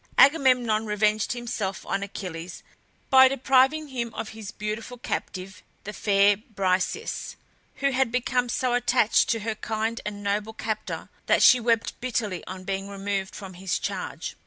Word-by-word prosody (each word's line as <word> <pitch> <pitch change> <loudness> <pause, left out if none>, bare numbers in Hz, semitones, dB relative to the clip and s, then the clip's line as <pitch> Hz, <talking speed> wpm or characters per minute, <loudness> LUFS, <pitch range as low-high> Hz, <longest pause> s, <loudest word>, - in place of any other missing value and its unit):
Agamemnon 250 -7 +4
revenged 210 +1 +1
himself 230 -5 -4
on 195 - -1
Achilles 180 -3 -7 0.5
by 265 0 +9
depriving 270 +3 +3
him 240 -3 -3
of 215 - -4
his 220 -3 -8
beautiful 215 +4 -5
captive, 190 -4 -5 0.2
the 210 - -6
fair 200 -1 +3
Briseis, 195 - -2 0.4
who 275 0 +1
had 260 -2 +1
become 250 0 0
so 255 0 0
attached 245 -2 +3
to 225 -1 +1
her 220 +1 -2
kind 220 +1 -3
and 205 -1 -6
noble 205 +2 -1
captor 220 -1 -4 0.2
that - - +4
she 250 - +8
wept 230 -1 0
bitterly 215 -7 -2
on 185 0 -7
being 195 +1 -3
removed 195 -1 -3
from 195 -2 -8
his 180 0 -2
charge. - - -4
220 Hz, 150 wpm, -26 LUFS, 200-245 Hz, 0.5 s, by